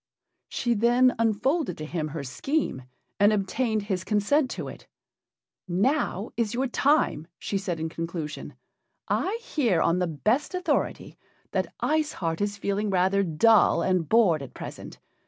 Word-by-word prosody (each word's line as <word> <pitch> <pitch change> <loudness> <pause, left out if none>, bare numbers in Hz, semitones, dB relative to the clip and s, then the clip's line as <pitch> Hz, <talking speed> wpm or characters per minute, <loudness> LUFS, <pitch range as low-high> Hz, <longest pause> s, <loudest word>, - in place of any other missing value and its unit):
She 240 -2 0
then 240 +3 +4
unfolded 230 - +1
to 155 - -6
him 155 -1 -3
her 150 -1 -5
scheme, 130 - -2 0.3
and 205 +1 +6
obtained 215 +2 0
his 190 -3 -2
consent 220 +8 +2
to - - -5
it. - - -10 0.8
"Now 205 - 0
is 230 -1 -1
your 260 +2 +1
time," 270 - +1
she 200 - -2
said, 180 -4 -3
in 160 - -2
conclusion. 165 -2 -5 0.5
"I 405 +5 0
hear 235 - +1
on 170 +2 +2
the 180 - +1
best 215 - 0
authority 365 0 -2 0.3
that - - -2
Ice 310 -1 +1
Heart 165 0 -3
is 205 0 -1
feeling 200 +1 -1
rather 190 +1 +2
dull 195 +1 +4
and 180 -5 +1
bored 195 -10 +4
at 135 - -9
present. - - -8
205 Hz, 150 wpm, -26 LUFS, 170-245 Hz, 0.8 s, and